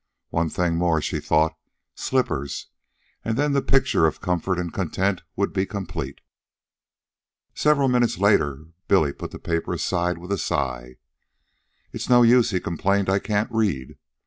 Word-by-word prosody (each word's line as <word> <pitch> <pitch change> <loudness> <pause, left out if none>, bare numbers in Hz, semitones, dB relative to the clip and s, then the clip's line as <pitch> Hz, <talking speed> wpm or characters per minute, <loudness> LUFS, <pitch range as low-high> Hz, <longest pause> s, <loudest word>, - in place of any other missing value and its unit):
One 80 0 0
thing 85 0 0
more, 85 -2 +2
she - - -2
thought 80 +1 +2 0.4
slippers; 80 - -2 0.5
and 115 0 -1
then 145 0 +1
the 140 - +2
picture 135 -13 +3
of 80 - -3
comfort 90 0 -1
and 85 -2 -3
content 95 +1 -1
would 100 - -1
be 95 0 0
complete. 85 -9 -5 1.3
Several 150 -2 +3
minutes 125 -5 +2
later 75 -7 +2 0.2
Billy 80 -8 +3
put - - -7
the - - -9
paper 85 -1 -2
aside 90 0 -1
with 90 +3 -9
a 100 - 0
sigh. 65 -4 -2 1.0
"It's - - -5
no 120 -1 +7
use," 120 0 +5
he 95 -4 0
complained. 95 +4 0
"I 100 - +3
can't 105 +1 -1
read." 100 - -1
90 Hz, 150 wpm, -24 LUFS, 80-110 Hz, 1.3 s, no